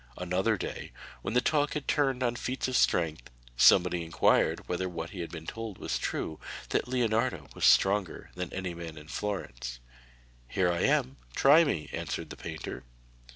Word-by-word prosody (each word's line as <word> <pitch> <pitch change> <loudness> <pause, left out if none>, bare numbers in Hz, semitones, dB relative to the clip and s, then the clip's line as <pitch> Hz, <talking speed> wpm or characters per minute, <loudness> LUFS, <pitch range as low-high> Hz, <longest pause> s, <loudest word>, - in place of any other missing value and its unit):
Another 95 +5 +1
day, - - -5 0.3
when - - -3
the 125 - +5
talk 150 0 +1
had 150 - -3
turned 135 -3 +1
on 120 -1 +1
feats 130 +2 -2
of 130 - -2
strength, 80 - +2 0.3
somebody 90 +6 +5
inquired 80 0 +2
whether 90 +1 -1
what 85 -1 -5
he 95 - -8
had 85 - -4
been 80 -2 -8
told 115 +1 -6
was - - -2
true, 80 - -3 0.3
that - - 0
Leonardo 125 -1 0
was - - 0
stronger 95 -3 +3
than 90 -1 -5
any 95 -2 -4
man 85 -2 -8
in 75 0 -11
Florence. 65 -13 -4 0.7
'Here 90 +5 +1
I 85 - -1
am; 65 +1 +2 0.2
try 150 +5 +7
me,' 85 - -1
answered - - -4
the - - -6
painter. 80 -2 -6
95 Hz, 170 wpm, -30 LUFS, 85-120 Hz, 0.7 s, try